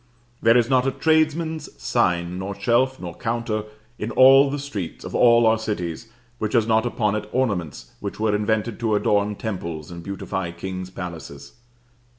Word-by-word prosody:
There 115 +1 +5
is 120 -2 +3
not 130 0 +2
a - - +2
tradesman's 155 - 0
sign 85 +7 0
nor 95 +1 -4
shelf 125 +5 +2
nor 85 -2 -6
counter 115 -1 -2 0.3
in 105 - -3
all 135 +3 +7
the 145 - -2
streets 110 - -6
of - - -7
all 120 -1 +5
our 110 0 +4
cities, 105 -2 -4 0.3
which 110 - -2
has 115 -3 +3
not 110 +1 +2
upon 105 -4 0
it 105 - -4
ornaments 100 - -2
which - - -6
were 110 -1 +1
invented 110 +1 -1
to 110 -3 +1
adorn 105 0 +1
temples 85 -8 -5
and 85 0 -8
beautify 95 -1 -4
kings' 95 +1 -6
palaces. 85 -7 -8
110 Hz, 165 wpm, -23 LUFS, 95-120 Hz, 0.3 s, all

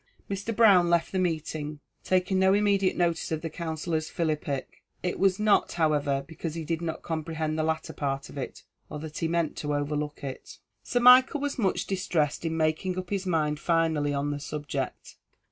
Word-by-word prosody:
Mr. 200 +3 -3
Brown 195 -6 +6
left 170 -1 +2
the 190 - 0
meeting, 155 -3 -2 0.2
taking 185 +1 +1
no 190 +1 +5
immediate 200 -2 +2
notice 170 -2 0
of 160 0 -2
the 165 - -3
Counsellor's 160 -1 -3
philippic. 150 -4 -3 0.2
It 180 - -2
was 190 -1 +3
not, 210 -1 +3
however, 145 -4 +1
because 165 0 -5
he 165 -1 -4
did 165 +1 -2
not 165 -1 -4
comprehend 160 -1 -2
the 155 - 0
latter 160 0 -2
part 140 -1 -2
of - - -12
it, 135 -3 -6 0.3
or - - -5
that 155 0 -7
he 165 - 0
meant 170 -1 0
to 150 -1 -2
overlook 145 0 -3
it. 135 -2 -7 0.2
Sir 245 - -1
Michael 255 +3 +7
was 285 -2 -2
much 195 -5 +1
distressed 170 -7 -1
in 160 0 -1
making 160 +4 0
up 185 0 -5
his 195 -1 -1
mind 150 -3 +1
finally 160 -4 +1
on 145 +1 -1
the 145 - -3
subject. 145 0 -5
160 Hz, 185 wpm, -27 LUFS, 150-185 Hz, 0.3 s, Michael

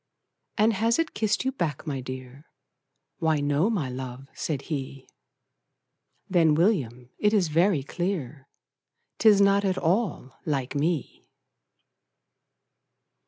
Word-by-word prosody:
"And 220 +1 +4
has 225 +3 +2
it 330 -1 -1
kissed 215 +4 0
you 265 - +1
back, 165 - -3
my 140 -4 -3
dear?" 130 +2 -9 0.7
"Why 160 -2 +2
no 145 +7 +1
my 185 - -1
love," 130 +1 -7
said 145 -4 -3
he. 135 -3 -5 1.2
"Then, 165 -4 +4
William, 130 - 0
it 210 +1 +3
is 185 -6 +2
very 165 -1 +2
clear 155 -5 -4 0.7
'Tis 215 -3 +6
not 200 0 +4
at 190 -2 0
all 175 - -1
LIKE 140 -4 -2
ME!" 155 +1 -2
160 Hz, 115 wpm, -26 LUFS, 135-200 Hz, 1.2 s, Tis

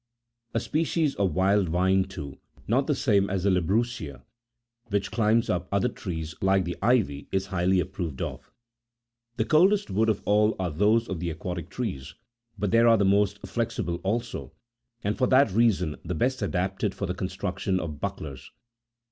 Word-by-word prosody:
A - - +3
species 155 +2 0
of 95 -6 0
wild 95 0 +3
vine,29 95 +2 +2
too— 70 -7 -7 0.3
not 130 +5 +2
the 150 - +2
same 100 -7 +2
as 95 -2 -1
the 100 - +3
labrusca— 90 - -1 0.6
which 100 -2 -1
climbs 115 +1 +2
up 90 0 -1
other 100 +5 +2
trees 80 -8 -5
like 95 -1 +3
the 85 - -3
ivy, 100 - +1
is 95 0 0
highly 95 -1 +1
approved 90 -6 -4
of. - - -5 0.9
The - - +1
coldest30 195 +6 +4
woods 110 +4 +2
of 110 - 0
all 105 +1 +3
are 90 -3 -2
those 105 +8 +2
of 95 -4 -4
the 85 0 -2
aquatic 85 +1 -5
trees; 75 - -5 0.4
but 100 -1 -1
they 115 - +5
are 115 -1 +6
the 100 - +2
most 100 +1 +2
flexible 115 -7 -2
also, 100 +7 -3 0.5
and 105 +1 0
for 125 - +1
that 130 -4 +4
reason 95 -7 +2
the 90 +1 -3
best 125 +7 0
adapted 95 +1 -1
for 100 - -3
the 90 - -2
construction 95 0 -2
of 75 -4 -6
bucklers. 75 -10 -5
95 Hz, 170 wpm, -26 LUFS, 90-115 Hz, 0.9 s, are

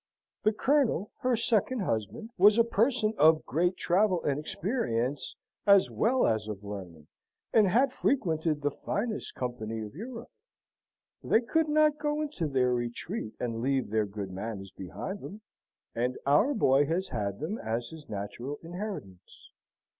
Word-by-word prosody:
The 215 - +3
Colonel, 240 - +1
her 250 -1 +2
second 235 +1 +1
husband, 195 - -3
was 205 +4 +6
a 230 - +6
person 230 0 +1
of 155 +1 +5
great 175 +4 +1
travel 185 0 +2
and 140 0 0
experience, 145 - -2 0.3
as 200 -1 +6
well 250 +3 +2
as 110 -2 +1
of 105 -2 -6
learning, 95 -7 -8 0.5
and 215 -3 +6
had 245 +9 +3
frequented 160 - 0
the 145 - +1
finest 215 - -3
company 115 -3 -4
of 105 - -10
Europe. 230 - -8 0.9
They 225 - +3
could 315 +6 +1
not 305 0 +3
go 295 0 -1
into 290 - -2
their 130 -3 +2
retreat 120 - -4
and 115 -2 -3
leave 130 -3 0
their 110 -1 +1
good 100 -1 -6
manners 95 0 -6
behind 145 - -6
them, 210 +2 -9 0.5
and 125 +2 -1
our 205 - +4
boy 140 - +4
has 180 +4 -1
had 100 -4 -3
them 160 +9 -3
as 115 +2 -3
his 160 -2 -12
natural 110 +8 -5
inheritance." 170 - -8
160 Hz, 150 wpm, -29 LUFS, -, 0.9 s, was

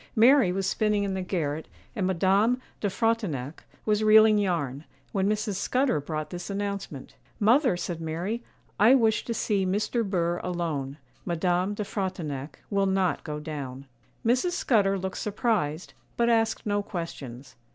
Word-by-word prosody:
Mary 245 -2 +6
was 195 +1 -1
spinning 210 +1 +1
in 195 -1 -1
the 190 - -2
garret, 160 -5 -2 0.3
and 195 -5 0
Madame 195 +7 +2 0.2
de 205 - 0
Frontignac 190 - -1 0.2
was 215 0 +2
reeling 215 0 +7
yarn, 155 -8 -1 0.3
when 195 0 +1
Mrs. 210 -2 -1
Scudder 250 - +1
brought 155 +1 -4
this 175 +1 -6
announcement. 200 -8 -4 0.3
'Mother,' 230 - +4
said 175 -1 -4
Mary, 175 +9 -3 0.4
'I 225 +6 +7
wish 225 -4 +2
to 235 - -2
see 205 -3 0
Mr. 210 +5 0
Burr 175 -4 0
alone; 155 -6 -3 0.3
Madame 180 +3 0
de 210 - -2
Frontignac 170 -9 -4
will 200 -1 +2
not 190 -2 +1
go 150 -2 -4
down.' 140 -3 -6 0.4
Mrs. 255 +10 +2
Scudder 205 - +2
looked 190 0 -4
surprised, 200 - -1 0.2
but 235 0 +3
asked 225 -1 +1
no 205 -1 +1
questions. 140 - -7
195 Hz, 150 wpm, -27 LUFS, 165-215 Hz, 0.4 s, reeling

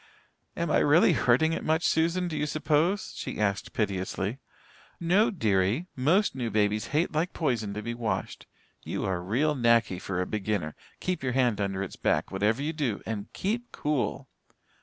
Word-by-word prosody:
"Am - - -1
I - - +4
really - - +5
hurting 130 +7 +3
it - - -3
much, 160 +2 +1
Susan, 170 +3 +1
do 165 - -4
you 150 - -1
suppose?" 155 +6 +1
she - - -5
asked 100 -1 0
piteously. 100 +2 -2 0.6
"No, 185 +6 +3
dearie. 110 - +1
Most 165 +11 +2
new 125 -3 -3
babies 105 0 +1
hate 155 +5 +1
like 160 +4 -1
poison 115 -10 -1
to 105 - -4
be 120 - -3
washed. 115 -2 -3 0.4
You - - -3
are 95 -2 -1
real 125 +12 +1
knacky 115 -7 +2
for 95 -2 -3
a 90 - 0
beginner. 100 -6 -2 0.3
Keep 185 -1 -2
your 130 -2 -1
hand 120 -5 +2
under 100 -1 -1
its 95 - -7
back, - - 0
whatever 105 +7 +1
you 155 +2 -1
do, 135 -10 -2
and 110 -1 -5
keep 235 +5 -2
cool." 140 -2 -2
120 Hz, 175 wpm, -28 LUFS, 105-160 Hz, 0.6 s, really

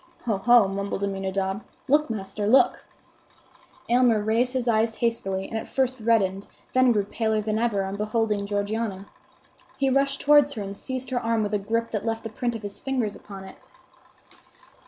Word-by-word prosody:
"Ho! 220 -4 +1
ho!" 240 -1 +6
mumbled 200 0 -3
Aminadab. 195 0 -2 0.2
"Look, 295 +1 +3
master! 205 -1 -3
look!" 260 +5 +4 1.0
Aylmer 240 -2 +4
raised 225 +4 +1
his 255 -2 -1
eyes 225 0 +2
hastily, 195 -5 -1
and 225 - -3
at - - -8
first 260 -1 0
reddened, 205 -4 +1 0.3
then 255 -1 +5
grew 210 -3 +2
paler 220 +1 0
than 215 +1 -1
ever, 220 -4 +1
on 195 +1 -4
beholding 210 -1 0
Georgiana. 205 -1 -2 0.7
He 270 -1 +1
rushed 275 +1 +1
towards 290 -1 +5
her 215 - -4
and 200 0 -6
seized 260 +3 -5
her 250 - +1
arm 230 -1 0
with 205 0 -3
a 210 - +2
gripe 230 +3 -1
that 215 -3 -2
left 225 0 -2
the 225 - -5
print 240 +2 -2
of 225 - -7
his 205 -1 -6
fingers 250 -6 -2
upon 195 -2 -10
it. 190 - -14
220 Hz, 175 wpm, -25 LUFS, 200-240 Hz, 1.0 s, ho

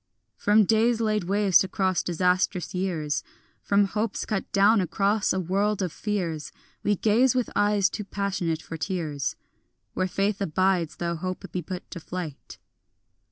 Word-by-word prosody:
From 210 +1 +4
days 225 +2 +3
laid 215 -4 0
waste 200 0 +4
across 190 -1 0
disastrous 180 +1 0
years, 170 -6 -1 0.4
From 200 0 +3
hopes 210 +2 -2
cut 215 -3 -3
down 200 +2 +5
across 200 +4 +1
a 190 - 0
world 195 +3 0
of 180 - -2
fears, 170 -7 -3 0.3
We 205 - +2
gaze 230 +6 +3
with 250 -2 0
eyes 205 -1 +3
too 210 - -5
passionate 190 -5 -2
for 165 - -7
tears, 155 -5 -2 0.6
Where 185 - 0
faith 200 +2 -1
abides 185 -2 +1
though 170 -1 -2
hope 185 +3 -4
be 180 - -2
put 180 +2 -7
to 175 - -6
flight. 165 -4 -7
190 Hz, 150 wpm, -26 LUFS, 175-205 Hz, 0.6 s, down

